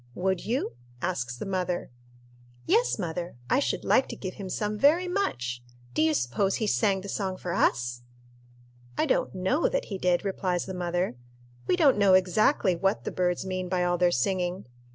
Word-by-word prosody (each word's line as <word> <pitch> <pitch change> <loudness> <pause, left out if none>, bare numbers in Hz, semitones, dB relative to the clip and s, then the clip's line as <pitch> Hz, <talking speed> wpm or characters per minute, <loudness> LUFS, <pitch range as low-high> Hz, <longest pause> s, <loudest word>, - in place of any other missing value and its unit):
"Would 190 0 0
you?" 245 +5 -1 0.3
asks 125 -9 -2
the - - -5
mother. 180 -6 -2 0.7
"Yes, 455 +8 +3
mother, 175 - -4 0.2
I - - +4
should 280 - -1
like 260 - +4
to - - -5
give 185 -2 -6
him 195 -2 -7
some 210 +2 -2
very 310 - +4
much. 125 - -2 0.3
Do 155 - +1
you 155 0 +3
suppose 125 - 0
he 220 - -1
sang 200 -2 +2
the 200 - -8
song 190 -2 -2
for 175 -2 -4
us?" 120 -9 +1 1.0
"I - - +2
don't - - 0
know 190 - +1
that - - -1
he 190 - -4
did," 180 +1 +1
replies 185 -2 -1
the 190 - -6
mother. 175 -5 -2 0.5
"We - - +3
don't 290 - +4
know 195 -2 +6
exactly 185 +2 +3
what 195 +4 0
the - - -3
birds 180 0 0
mean 185 -1 -3
by 180 -1 +1
all 175 0 +1
their 180 - +5
singing. 180 +5 -1
185 Hz, 185 wpm, -27 LUFS, 175-205 Hz, 1.0 s, know